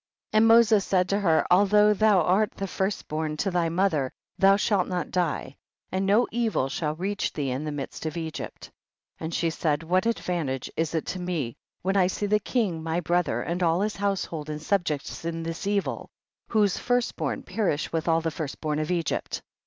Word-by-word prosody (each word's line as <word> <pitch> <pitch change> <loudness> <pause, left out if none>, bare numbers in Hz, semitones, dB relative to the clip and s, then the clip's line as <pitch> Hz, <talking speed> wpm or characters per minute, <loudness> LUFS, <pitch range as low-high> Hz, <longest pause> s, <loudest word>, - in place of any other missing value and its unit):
52. - - +2
And 220 +1 +6
Moses 225 -3 +6
said 185 -1 +1
to 200 - +1
her, 165 -6 +3
al 195 +3 +6
though 210 +1 +5
thou 210 -3 +4
art 200 +6 +3
the 195 - -3
first 190 +1 -2
born 155 0 -2
to 195 +4 0
thy 175 -2 +1
mother, 165 -7 +1 0.2
thou 195 0 +5
shall 200 -2 +2
not 180 -1 -3
die, 170 -6 -1 0.3
and 190 +1 0
no 215 +5 +4
evil 225 - 0
shall 150 +1 -2
reach 195 +4 -2
thee 140 -4 -2
in 135 +4 -3
the 155 - -2
midst 145 +2 -5
of 155 - -4
Egypt. 160 -2 -6 0.5
53. - - -9
And 165 - -6
she 165 -1 +1
said, 155 -1 0
what 185 +6 +1
advantage 170 - -2
is 165 0 -1
it 160 - -1
to 185 +1 -4
me, 170 -10 -3 0.3
when 190 +2 0
I 185 -2 +5
see 195 +2 -2
the 210 +1 +3
king, 205 -9 -1
my 165 +1 -1
brother, 175 +1 0
and 175 +2 -3
all 170 +1 +2
his 210 +1 -1
household 190 -6 -2
and 150 0 -4
subjects 160 -4 -1
in 165 0 -3
this 165 +4 -4
evil, 200 -1 -1 0.4
whose 210 -4 +2
first 245 0 0
born - - -3
perish 185 -9 -1
with 165 0 -1
all 165 0 +3
the 165 0 -1
first 150 -2 -5
born 150 -1 -1
of 155 - -2
Egypt? 170 -4 -2
180 Hz, 205 wpm, -26 LUFS, 160-200 Hz, 0.5 s, And